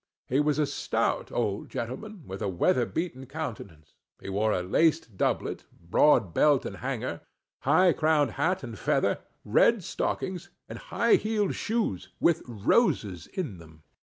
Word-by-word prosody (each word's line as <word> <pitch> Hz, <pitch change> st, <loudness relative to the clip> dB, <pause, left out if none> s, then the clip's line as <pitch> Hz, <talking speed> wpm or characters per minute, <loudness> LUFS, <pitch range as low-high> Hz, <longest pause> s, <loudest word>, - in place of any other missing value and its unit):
He 130 Hz, -, +1 dB
was 150 Hz, 0 st, +2 dB
a 150 Hz, -, +3 dB
stout 140 Hz, -, -1 dB
old -, -, -2 dB
gentleman, 170 Hz, -, -6 dB
with 95 Hz, +2 st, -7 dB
a 105 Hz, -, 0 dB
weather 115 Hz, +7 st, +2 dB
beaten 135 Hz, -6 st, -4 dB
countenance; 110 Hz, -, -7 dB, 0.3 s
he -, -, -8 dB
wore 105 Hz, +3 st, +1 dB
a 90 Hz, -, 0 dB
laced 150 Hz, -, +1 dB
doublet, -, -, -1 dB
broad 90 Hz, -, +3 dB
belt 145 Hz, -3 st, +4 dB
and -, -, -5 dB
hanger, -, -, -4 dB, 0.4 s
high 170 Hz, +5 st, +4 dB
crowned 155 Hz, -5 st, +2 dB
hat 160 Hz, -, 0 dB
and 115 Hz, -5 st, -7 dB
feather, -, -, +1 dB, 0.3 s
red -, -, +4 dB
stockings, 185 Hz, -3 st, -3 dB, 0.2 s
and -, -, -8 dB
high 465 Hz, -4 st, +2 dB
heeled 215 Hz, -2 st, 0 dB
shoes, 220 Hz, -, -2 dB
with 170 Hz, -, +3 dB
roses 110 Hz, -, +1 dB
in 145 Hz, -, -5 dB
them. 80 Hz, -2 st, -16 dB
135 Hz, 150 wpm, -28 LUFS, 100-165 Hz, 0.4 s, belt